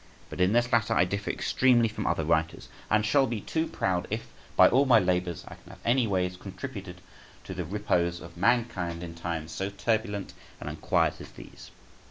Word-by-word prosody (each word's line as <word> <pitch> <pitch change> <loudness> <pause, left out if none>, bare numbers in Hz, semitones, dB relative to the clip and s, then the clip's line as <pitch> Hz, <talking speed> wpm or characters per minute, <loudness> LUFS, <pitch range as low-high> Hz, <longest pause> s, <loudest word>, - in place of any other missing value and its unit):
But - - -4
in 90 +2 +4
this 120 +1 +2
latter 115 -1 +3
I 90 - +4
differ 100 +2 -3
extremely 120 -3 +3
from 110 - -4
other 80 - 0
writers, 80 0 0 0.2
and 110 0 +3
shall 135 +4 +3
be 115 -2 -3
too 160 +10 -2
proud 90 -2 -1
if, 110 +2 -4 0.3
by - - +8
all 135 +2 +3
my 120 -3 +7
labours, 90 -3 0
I - - -9
can - - -17
have - - -13
any 120 0 +3
ways 90 -2 -1
contributed 100 -3 -8 0.4
to 95 - -7
the 90 -1 -4
repose 85 -2 0
of 85 0 -12
mankind 95 -5 0
in 85 -1 -7
times 85 -1 -4
so 95 +4 -3
turbulent 105 -1 -2 0.3
and - - -5
unquiet - - 0
as - - -10
these. - - -12
100 Hz, 195 wpm, -28 LUFS, 90-115 Hz, 0.4 s, by